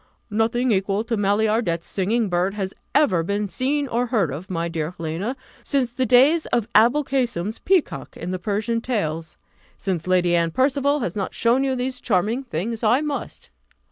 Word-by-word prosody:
"Nothing 230 +4 +1
equal 195 +1 +1
to 230 0 -2
Maillardet's 205 -4 +1
singing 215 +4 0
bird 180 +2 0
has 195 -2 -3 0.2
ever 245 - +4
been 200 +4 -1
seen 280 +7 -1
or 245 0 0
heard 210 - +1
of, 165 +7 -7
my 170 -2 -1
dear 165 0 -4
Helena, 170 +10 -3 0.3
since 260 -4 0
the 255 0 0
days 275 +8 +5
of 235 -3 0
Aboulcasem's 235 -4 +2
peacock 370 -4 0
in 175 +2 -5
the 185 - -3
Persian 215 +4 -1
Tales. 165 -10 -3 0.4
Since 185 -4 -3
Lady 180 -1 +3
Anne 170 -1 +2
Percival 280 - +1
has 180 -7 -3
not 195 -2 -3
shown 240 +3 +3
you 265 -1 0
these 255 0 -3
charming 220 +5 0
things, 225 +1 -4
I 235 +5 +3
must." 300 -2 -5
215 Hz, 170 wpm, -23 LUFS, 185-255 Hz, 0.4 s, days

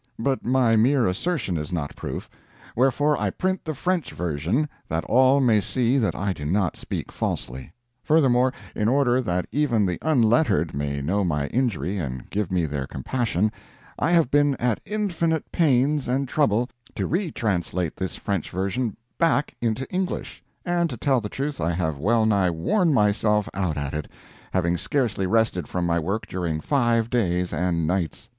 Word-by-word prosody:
But 135 +3 -1
my 125 -2 +3
mere 125 +3 +4
assertion 100 - -1
is 75 - -5
not 80 -5 -3
proof; - - -5 0.5
wherefore 140 +4 +3
I - - 0
print 185 0 -2
the 155 -2 -3
French 180 +3 -1
version, 90 - -1 0.2
that 80 +1 -1
all 130 +3 +4
may 115 -6 +4
see 125 +5 +1
that 110 - 0
I 100 0 -1
do 75 - -8
not 90 +4 0
speak - - -5
falsely; 65 +5 -4 0.3
furthermore, 130 -5 +4 0.2
in 105 - 0
order 130 0 +3
that 90 -6 -1
even 130 -8 +2
the 90 -2 -2
unlettered 120 - +2
may 70 0 -2
know 100 +7 +1
my 75 -5 0
injury 105 -6 -1
and 65 -6 -5
give 100 -3 -1
me 90 -3 +1
their 70 -3 -3
compassion, 110 - -1 0.5
I - - +1
have 165 -6 +3
been 145 -1 +3
at 120 -3 -1
infinite 175 -6 -1
pains 145 -2 +2
and 135 +2 0
trouble 125 -4 +1 0.2
to - - -1
retranslate 100 - -1
this 95 - -3
French 100 -6 -3
version 100 +5 -2 0.2
back 165 -3 +2
into 120 +3 -1
English; 185 0 -3 0.2
and 175 -1 +1
to 125 - -5
tell 130 +1 +2
the 105 - -5
truth 140 +4 -3
I 85 +1 +1
have 80 -4 -2
well 110 +7 +2
nigh 100 -4 +3
worn 160 - +1
myself 105 -3 +2
out 90 -5 -1
at 70 -1 -3
it, 75 0 -3 0.4
having 85 -2 +1
scarcely 110 - 0
rested 110 -4 +1
from 90 -1 -2
my 85 0 +1
work 100 +7 -2
during 85 -4 -2
five 120 - +1
days 90 -7 0
and 85 0 0
nights. 90 0 -2
110 Hz, 170 wpm, -24 LUFS, 90-135 Hz, 0.5 s, mere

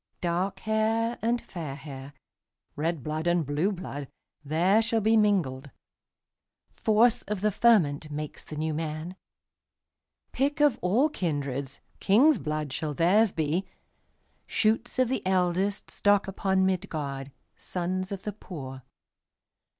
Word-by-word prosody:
Dark 185 +3 -1
hair 225 +2 0
and 235 +2 +1
fair 160 -10 -6
hair, 140 -1 -9 0.6
Red 160 -2 -2
blood 155 +3 -3
and 175 -2 +2
blue 150 +8 0
blood, 145 -7 -6 0.4
There 175 +9 +3
shall 225 0 +1
be 220 +1 +3
mingled; 175 -11 +1 1.0
Force 225 +2 +3
of 205 -2 -3
the 210 0 +2
fermentMakes 150 -9 +1
the 155 - -8
New 155 +1 -1
Man.Pick 170 - -6
of 290 -5 +4
all 220 +11 +3
kindreds, 140 - -3 0.2
King's 250 +7 +5
blood 150 -2 -3
shall 150 -1 -3
theirs 195 +7 +4
be, 165 +4 -1 0.8
Shoots 225 +2 +1
of 255 -1 +3
the 260 +2 -1
eldestStock 190 +2 +1
upon 190 0 +1
Midgard, 145 -7 -3 0.2
Sons 185 +2 -3
of 195 -1 -5
the 210 - -4
poor. 135 -10 -8
185 Hz, 120 wpm, -27 LUFS, 150-215 Hz, 1.0 s, King's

